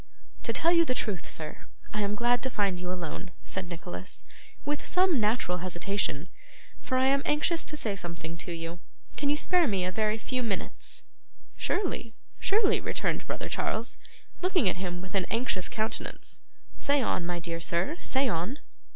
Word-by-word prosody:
'To - - 0
tell 335 - +4
you 335 -1 +7
the 255 -6 0
truth, 205 -7 -2
sir, 155 -1 -5 0.3
I 210 - 0
am 205 0 +1
glad 240 +2 +3
to 260 - 0
find 200 -6 +1
you 180 0 -3
alone,' 180 0 -4
said 190 -2 -3
Nicholas, 175 +1 -5 0.4
with 295 0 0
some 365 -6 +4
natural 210 -5 +2
hesitation; 180 -3 0 0.5
'for 255 - 0
I 260 - +5
am 275 +1 +4
anxious 320 +3 +2
to 300 - -4
say 215 -8 +1
something 170 -3 -4
to 175 - -5
you. 165 +1 -4 0.4
Can 285 - +1
you 295 - +3
spare 355 +1 +4
me 195 -5 +2
a 185 - 0
very 215 +2 +1
few 255 +3 -1
minutes?' 215 -6 -2 0.5
'Surely, 285 - -1 0.2
surely,' 400 0 +4
returned - - 0
brother - - -2
Charles, 230 +3 -1 0.4
looking 365 - +4
at 180 - +3
him 180 -1 -3
with 190 - -8
an 195 -2 +2
anxious 225 -6 +1
countenance. 220 -1 -2 0.4
'Say 285 0 +3
on, 185 - +1
my 175 0 -1
dear 165 0 -3
sir, 170 - +1
say 270 +1 +3
on. 200 - 0
210 Hz, 175 wpm, -30 LUFS, 180-270 Hz, 0.5 s, you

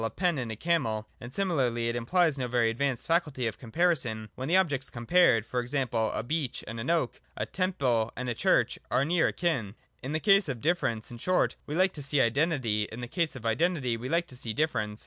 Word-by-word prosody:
a 115 - 0
pen 175 - 0
and 120 -3 -3
a - - -4
camel: 115 -7 0
and 120 - -9
similarly, 130 -10 0
it 115 - -1
implies 160 +6 +2
no 130 -3 -2
very 120 -2 +2
advanced 130 +1 -1
faculty 165 -7 0
of 115 - -3
comparison, 125 -6 0
when 130 - -5
the 175 +4 +4
objects 145 -8 0
compared, 120 - +3
e.g. 125 +3 0
a 110 -1 0
beech 140 0 -2
and 115 +2 -5
an 115 - -3
oak, 165 -7 0 0.2
a - - -1
temple 135 -12 0
and 125 +1 -3
a 120 - 0
church, - - +2
are 135 - +2
near 170 +2 +3
akin. 130 - -1 0.3
In 130 - -5
the 155 - 0
case 195 -2 +4
of 130 -3 -3
difference, 120 -8 -1
in 120 - -9
short, 185 +8 +1
we 150 - -3
like 185 +2 +3
to 150 - -5
see 140 +1 0
identity, 120 -4 +1
and - - -12
in 120 - -6
the 120 - -4
case 165 +2 -1
of 120 -3 -9
identity 130 0 +1
we 120 +3 -5
like 170 +2 +1
to 130 - -11
see 115 -3 -5
difference. 110 -8 -1
130 Hz, 225 wpm, -29 LUFS, 115-165 Hz, 0.3 s, the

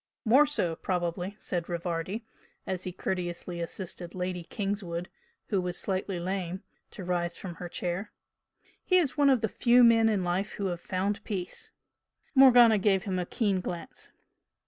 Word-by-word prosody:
"More 265 +7 +6
so, 175 - 0
probably!" 180 +2 -2
said 175 -4 -4
Rivardi, 175 +5 -3 0.4
as 185 -1 -3
he 185 - -3
courteously 175 -1 -3
assisted 175 0 -5
Lady 180 -1 -3
Kingswood, 190 -3 -3 0.4
who 195 -4 +1
was 180 -1 -2
slightly 190 -1 -1
lame, 185 +1 -3 0.3
to 195 - -9
rise 175 -1 -1
from 185 -3 -6
her 175 - -5
chair 180 +4 -3 0.7
"He 365 - +4
is 310 -8 +2
one 290 -2 +4
of 260 -4 +4
the 220 - +1
few 245 +3 +4
men 225 -1 +6
who 220 - +3
in 190 - -1
life 180 +4 -1
have 180 -4 -3
found 200 +3 -2
peace." 195 -6 -4 0.6
Morgana 245 -5 +7
gave 195 -1 +2
him 185 -3 -2
a 175 - -3
keen 200 -5 0
glance. 175 -1 -7
185 Hz, 160 wpm, -29 LUFS, 175-215 Hz, 0.7 s, Morgana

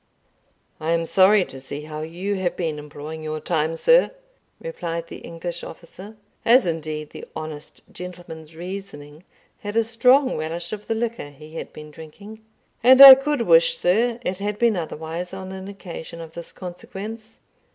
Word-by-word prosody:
"I 160 +2 0
am 165 0 0
sorry 190 +2 +5
to 135 - -11
see 140 +2 -7
how 155 0 -7
you 175 +6 -4
have 185 -3 -2
been 160 -4 -3
employing 150 +2 -8
your 155 0 -4
time, 160 0 -1
sir," - - +4 0.5
replied 170 - -5
the - - -8
English 170 +1 -6
officer 190 +6 -11 0.3
as 245 +1 +5
indeed 155 -2 -4
the - - -9
honest 155 -1 -7
gentleman's 170 -3 -10
reasoning 170 -4 -8 0.4
had 205 +1 -6
a 230 - +4
strong 250 +4 +3
relish 165 +3 -4
of 210 -1 -7
the 225 - 0
liquor 230 -8 -3
he 155 +2 -14
had 165 - -7
been 150 0 -11
drinking 200 +8 -12 0.4
"and 255 +2 +7
I 275 -1 +14
could 270 -1 0
wish, - - +4
sir, 230 - +1
it 185 -2 -3
had 205 +1 -3
been 235 -2 +3
otherwise 165 +2 -5
on 190 0 -7
an 190 0 -8
occasion 180 -4 -9
of 165 -1 -9
this 170 0 -9
consequence. 210 +5 -9
175 Hz, 165 wpm, -23 LUFS, 160-215 Hz, 0.5 s, I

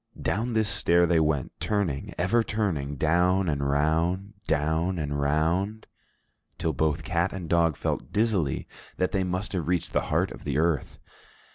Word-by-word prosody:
Down 115 +4 -1
this 110 -1 +2
stair 85 -3 +3
they 85 -1 +3
went, 75 -4 0
turning, 100 -10 -1
ever 95 +7 +2
turning, 90 -11 -1
down 90 +6 +2
and 70 -3 0
round, 85 +7 +1
down 80 +4 +1
and 70 -2 -2
round, 85 +9 0 0.7
till 80 - -1
both 75 +3 0
cat 90 +1 0
and 95 -3 -6
dog 85 -2 +3
felt - - -3
dizzily 100 - 0 0.3
that 90 - 0
they 95 -3 +1
must 90 +3 -2
have 85 -5 -2
reached 90 -1 -1
the - - +2
heart - - +1
of - - -10
the - - -2
earth. 80 -3 0
85 Hz, 160 wpm, -27 LUFS, 75-95 Hz, 0.7 s, stair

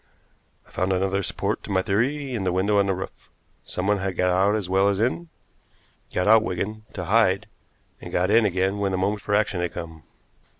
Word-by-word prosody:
I - - -22
found 95 +1 -1
another 95 +1 0
support - - -2
to - - -11
my 95 -1 +2
theory 130 +7 0
in 110 -5 -2
the 90 - 0
window 100 +3 +2
on 100 - +2
the 95 - +1
roof. 95 - -8 0.3
Someone 100 +2 -1
had 95 -2 -3
got 90 0 +2
out 95 +3 +3
as 105 -4 -2
well 95 +2 +3
as 100 -1 -1
in 130 +9 -1 0.8
got 90 - 0
out, 110 +1 +6
Wigan, 105 +2 -4
to 90 - -5
hide, 100 -1 +3 0.6
and - - -8
got 90 +3 +1
in 115 +1 +5
again 95 0 0
when 100 -1 0
the - - 0
moment 100 +2 -1
for 105 - 0
action 100 -4 +1
had 90 - -2
come." 80 -2 -7
95 Hz, 210 wpm, -24 LUFS, 95-105 Hz, 0.8 s, out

